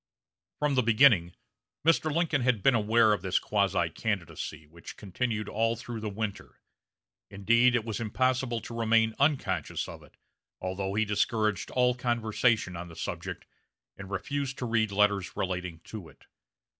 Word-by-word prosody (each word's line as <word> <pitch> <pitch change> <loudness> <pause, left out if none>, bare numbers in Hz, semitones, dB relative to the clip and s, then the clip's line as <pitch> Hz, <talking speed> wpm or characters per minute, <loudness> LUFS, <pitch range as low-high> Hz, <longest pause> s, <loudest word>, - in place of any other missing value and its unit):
From 150 -1 0
the 130 - +3
beginning 110 -7 +4 0.5
Mr. 160 -1 +3
Lincoln 155 -3 +1
had 125 -5 +1
been 135 - +5
aware 110 0 +4
of 105 - -2
this 95 -1 0
quasi 95 -4 +1
candidacy, 85 -7 -4
which 85 +3 -12
continued 105 +2 -3
all 115 +2 0
through 115 0 -7
the 110 -1 -4
winter 105 0 -5 0.7
Indeed, 115 +5 +3
it 115 -2 0
was 110 -3 -3
impossible 125 +1 0
to 115 +2 -8
remain 110 0 +3
unconscious 140 0 0
of - - -9
it, - - -20 0.4
although 95 +1 -3
he 110 +1 +2
discouraged 105 0 0
all 125 -1 +2
conversation 115 -4 0
on 85 +1 -6
the 85 - -12
subject, - - -5 0.5
and 95 0 -10
refused 135 +8 -3
to 125 - -3
read 115 -3 +1
letters 100 -1 +1
relating 90 -3 -3
to 95 -3 -9
it. - - -21
110 Hz, 155 wpm, -29 LUFS, 95-120 Hz, 0.7 s, been